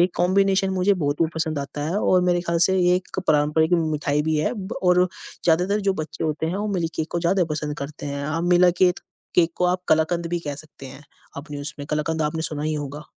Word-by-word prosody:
ये 175 - +6
कॉम्बिनेशन 195 +1 +2
मुझे 190 +2 +3
बहुत 145 -4 -2
वो 165 - +4
पसंद 160 -2 -2
आता 140 +1 -5
है 180 - -1
और 185 -3 +3
मेरे 175 -1 +2
ख़्याल 170 -1 -1
से 190 0 +1
ये 180 0 +4
एक 185 - -7
पारम्परिक 150 +2 +3
मिठाई 150 -3 0
भी 160 0 0
है 150 - 0
ब 205 -1 -6
और 180 0 +4 0.4
ज़्यादातर 180 +5 +2
जो 195 -1 +1
बच्चे 155 -1 -5
होते 155 +1 -1
हैं, 170 - -2
वो 205 +1 -2
मिल्क 170 -3 -1
केक 160 0 -2
को 170 - -1
ज़्यादा 180 +2 +2
पसंद 150 -1 -3
करते 140 +1 -6
हैं। 140 0 -4
आप 165 +2 -2
मिला 180 0 +5
केत 180 0 +2 0.4
केक 170 -1 +3
को 180 - 0
आप 180 +1 +1
कलाकंद 160 +2 +2
भी 175 - 0
कह 145 -3 -4
सकते 145 -2 -12
हैं, 135 +2 -11 0.3
अपने 145 0 -7
उसमें 145 0 -7
कलाकंद 155 +1 -1
आपने 160 +2 -1
सुना 150 -1 -3
ही 155 0 -1
होगा। 145 0 -5
160 Hz, 230 wpm, -23 LUFS, 150-180 Hz, 0.4 s, ये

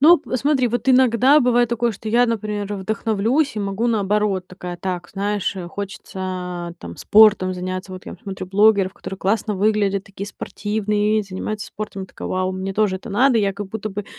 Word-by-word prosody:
Ну, 330 +4 +8
посмотри, 260 -2 0
вот 240 +2 -2
иногда 255 +3 +5
бывает 245 -1 +3
такое, 235 0 +1
что 215 +1 -7
я, 240 +2 +4
например, 210 -3 -2
вдохновлюсь 220 +7 0
и - - -1
могу 200 +3 -1
наоборот. 205 -3 +1
Такая, 180 -1 -7
так, 180 0 -4
знаешь, 200 0 -2
э, 180 - -5
хочется, 185 -2 -5
там, 85 0 -9
спортом 205 -3 +5
заняться. 185 +1 -5
Вот 185 0 -9
я - - -7
смотрю 190 -2 -6
блогеров, 200 -1 +4
которые 195 - -8
классно 210 +2 0
выглядят, 200 -1 +1
такие 200 0 -7
спортивные, 210 +1 -1
занимаются 200 +2 -5
спортом. 205 -2 -6
Я - - -7
такая: - - -8
"Вау, 185 0 -1
мне 190 +1 -4
тоже 205 -3 +2
это 210 - -10
надо". 245 +4 +3
Я 200 -2 +1
как 200 0 -6
будто 215 +1 -4
бы 205 0 -5
205 Hz, 180 wpm, -21 LUFS, 190-220 Hz, -, Ну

